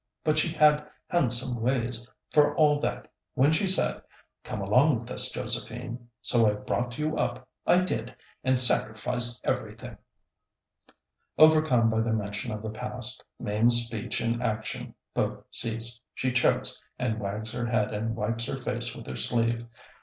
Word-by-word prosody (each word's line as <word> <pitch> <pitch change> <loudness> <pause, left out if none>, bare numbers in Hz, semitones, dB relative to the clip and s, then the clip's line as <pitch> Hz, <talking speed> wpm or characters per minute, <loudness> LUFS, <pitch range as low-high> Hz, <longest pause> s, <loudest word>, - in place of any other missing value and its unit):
But 155 0 +2
she 165 - +1
had 150 -2 +3 0.2
handsome 125 -7 +1
ways, 120 -1 -1 0.2
for 150 -1 +4
all 150 -3 +4
that, - - -3 0.3
when 140 +4 +4
she 160 +5 +1
said, 190 - +3 0.4
'Come - - -5
along 125 +7 +3
with 120 +2 -11
us, - - +6
Josephine!' 120 0 -3
So 115 -3 +3
I 105 - +3
brought 120 +4 -3
you 155 +1 -1
up, 125 +1 -2 0.2
I 180 +1 +5
did, 120 -9 -3 0.3
and 130 -1 +2
sacrificed 120 0 +2
everything...." - - -4 1.4
Overcome 155 -6 +5
by 110 0 +1
the 115 0 0
mention 105 +2 -3
of 105 0 -6
the 110 - -4
past, 110 - -2 0.2
Mame's 115 +3 +3
speech 115 0 -4
and 115 +1 -1
action 110 -2 -4 0.2
both - - -2
cease. 115 +1 +1 0.2
She 130 - -1
chokes 125 0 +1 0.2
and 110 -3 -2
wags 105 +2 -4
her 120 0 -3
head 110 -3 0
and 110 +2 -2
wipes 115 +1 -2
her - - -3
face - - -3
with - - -10
her 65 - -6
sleeve. 115 0 0
120 Hz, 155 wpm, -27 LUFS, 110-130 Hz, 1.4 s, us